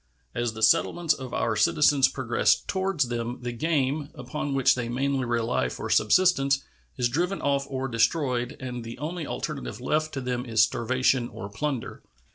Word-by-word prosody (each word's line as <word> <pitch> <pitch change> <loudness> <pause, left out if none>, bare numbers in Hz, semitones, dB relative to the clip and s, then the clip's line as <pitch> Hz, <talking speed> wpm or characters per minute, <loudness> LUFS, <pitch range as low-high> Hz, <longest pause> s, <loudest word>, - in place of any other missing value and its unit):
As 120 -2 -1
the 110 0 -5
settlements 160 +8 +3
of 130 -4 -8
our 110 - 0
citizens 135 +5 +4
progress 120 -4 +2
toward 190 -4 -1
them, 120 -1 -1
the 120 - -2
game, 145 +1 0
upon 135 +2 -4
which 135 -2 +4
they 120 -2 -3
mainly 135 +1 0
rely 115 - 0
for - - -5
subsistence, 140 - +3 0.3
is 125 -2 +2
driven 175 +10 -1
off 140 -1 0
or 135 -1 -2
destroyed, 125 +1 0
and 125 -2 -5
the 115 +1 -8
only 160 +1 -4
alternative - - -5
left 155 +1 0
to 135 - -3
them 125 -1 -2
is 115 -3 +3
starvation 125 +2 +1
or 100 - -8
plunder. 130 +4 -4
130 Hz, 165 wpm, -26 LUFS, 120-145 Hz, 0.3 s, citizens